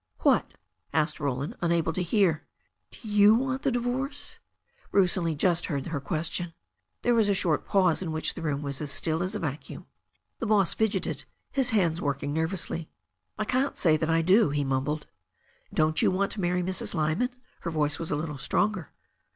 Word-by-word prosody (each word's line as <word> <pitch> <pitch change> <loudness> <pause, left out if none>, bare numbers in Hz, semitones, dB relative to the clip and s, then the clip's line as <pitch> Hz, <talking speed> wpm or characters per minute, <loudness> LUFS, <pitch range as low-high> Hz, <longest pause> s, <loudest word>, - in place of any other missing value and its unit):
"What?" - - +2 0.4
asked 155 +1 +1
Roland, 140 -1 -2
unable 170 -1 +1
to 185 - -1
hear. 175 -3 +2 0.5
"Do 225 - -12
you 210 +1 +6
want 260 +2 -1
the 275 - +1
divorce?" 265 +4 -3 0.5
Bruce 190 -3 +3
only 165 -4 -1
just 175 +3 +1
heard 140 -4 -2
her 160 -4 -3
question. 165 +4 -2 0.5
There 245 - +3
was 220 -3 +3
a 200 - +3
short 170 -5 0
pause, 185 -4 +3
in 170 -4 -3
which 155 0 -1
the - - -8
room 150 -3 -2
was 140 0 -3
as 145 -2 -4
still 160 +3 0
as 185 +1 -1
a - - -2
vacuum. 145 -2 -5 0.5
The 230 - -2
boss 205 -4 +4
fidgeted, 220 -2 -1 0.3
his 265 -2 +1
hands 175 -7 +2
working 140 0 -2
nervously. 160 0 -2 0.5
"I 215 - -1
can't 260 +5 0
say 160 -4 +4
that 160 0 -1
I 165 0 +3
do," 190 +2 +5
he 145 0 0
mumbled. 135 +3 -1 0.7
"Don't 155 0 +2
you - - +4
want 195 +2 0
to 205 - -3
marry 180 0 +1
Mrs. 185 +1 0
Lyman 160 +10 +1 0.2
?" - - -36
Her 170 - -3
voice 150 -2 0
was 165 - -1
a - - +1
little 150 -2 -4
stronger. 190 +4 0
170 Hz, 190 wpm, -27 LUFS, 155-205 Hz, 0.7 s, you